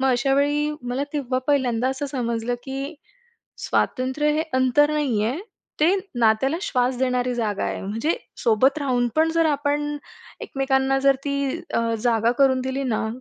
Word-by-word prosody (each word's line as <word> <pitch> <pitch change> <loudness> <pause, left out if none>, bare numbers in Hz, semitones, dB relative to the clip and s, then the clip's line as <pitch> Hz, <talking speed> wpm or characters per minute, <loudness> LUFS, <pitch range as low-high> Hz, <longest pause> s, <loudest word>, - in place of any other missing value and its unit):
मग 265 - +2
अशा 265 +2 +2
वेळी 290 +2 +1
मला 245 +3 -2
तेव्हा 265 -4 -1
पहिल्यांदा 255 -4 +2
असं 265 +2 -3
समजलं, 240 -3 -2
की 275 +3 -5 0.6
स्वातंत्र्य 260 +3 0
हे 310 +1 +1
अंतर 260 +3 +3
नाहीये, 250 -5 0 0.4
ते 335 +5 +5 0.3
नात्याला 230 +7 +3
श्वास 250 -6 0
देणारी 250 -1 0
जागा 215 -4 -1
आहे. - - -3
म्हणजे 225 - -1 0.2
सोबत 255 +6 +3
राहून 250 -4 +1
पण 320 +1 +3
जर 330 -1 +3
आपण 295 0 0 0.4
एकमेकांना 270 0 0
जर 275 0 +4
ती 280 -1 -1 0.4
अ, - - +3 0.2
जागा 230 0 +2
करून 265 -2 +4
दिली 260 +1 -2
ना, 225 -3 -1
265 Hz, 150 wpm, -23 LUFS, 245-285 Hz, 0.6 s, ते